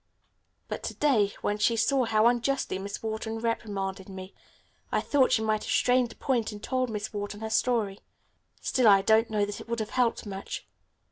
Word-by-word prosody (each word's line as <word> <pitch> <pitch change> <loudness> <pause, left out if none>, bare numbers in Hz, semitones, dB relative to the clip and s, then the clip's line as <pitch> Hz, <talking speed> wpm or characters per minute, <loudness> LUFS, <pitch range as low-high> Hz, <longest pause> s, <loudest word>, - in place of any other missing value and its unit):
But, - - -4
to - - -4
day, 230 -9 +3
when 210 0 -1
she 230 +2 +3
saw 250 +3 +2
how 220 -1 +3
unjustly 245 -3 +1
Miss 200 +2 -6
Wharton 220 0 -3
reprimanded 200 -4 -3
me 190 0 -8 0.6
I - - +2
thought 275 -3 +2
she 220 - +3
might 215 -1 0
have - - -4
strained 250 -1 +3
a - - -13
point 240 -5 0
and 210 0 -10
told 255 -1 0
Miss 210 -1 -4
Wharton 205 0 -5
her 220 0 -4
story. 220 -4 +1 0.6
Still 250 -3 +2
I 195 -2 +7
don't 220 +2 +4
know 210 -2 +1
that 205 0 -6
it - - -12
would 235 0 -1
have 215 -1 -4
helped 245 -3 +1
much." 195 -1 -6
220 Hz, 195 wpm, -28 LUFS, 205-240 Hz, 0.6 s, I